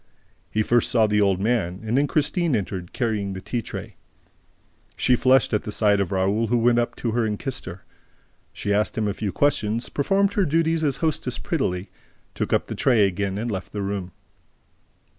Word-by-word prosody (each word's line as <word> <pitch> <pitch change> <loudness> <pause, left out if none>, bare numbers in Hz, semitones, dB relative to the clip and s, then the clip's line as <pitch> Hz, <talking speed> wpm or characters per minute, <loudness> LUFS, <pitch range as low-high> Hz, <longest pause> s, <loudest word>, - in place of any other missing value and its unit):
He 110 - 0
first 120 +1 +2
saw 115 -2 +4
the 105 0 +2
old 100 -2 +2
man; 100 -4 0
and 110 +2 -1
then 140 +2 +3
Christine 155 0 +1
entered, 90 -3 -4
carrying 105 -5 -1
the 95 - -5
tea 120 +5 -3
tray. - - -8 1.0
She 125 - +3
flushed 130 0 +3
at 105 - +2
the 105 - -6
sight 105 -1 +3
of 100 -1 -1
Raoul, 100 +4 +1
who 120 +3 +2
went 120 +1 +3
up 120 - -1
to 115 - -2
her 120 +1 +1
and 105 -1 -1
kissed 135 +2 -4
her. 90 +1 -9 0.7
She 100 - -2
asked 105 +2 0
him 110 -1 +1
a 100 - -1
few 105 -1 -3
questions, 120 -5 0
performed 195 +7 +1
her 200 - +2
duties 165 +1 +1
as 140 -3 +1
hostess 145 -5 -1
prettily, 95 - -2 0.4
took - - -3
up - - +2
the - - -6
tray 115 -6 +3
again 95 +1 -2
and 115 +2 -2
left 95 -2 -5
the 105 -1 -3
room. 95 -2 -3
110 Hz, 200 wpm, -24 LUFS, 100-130 Hz, 1.0 s, saw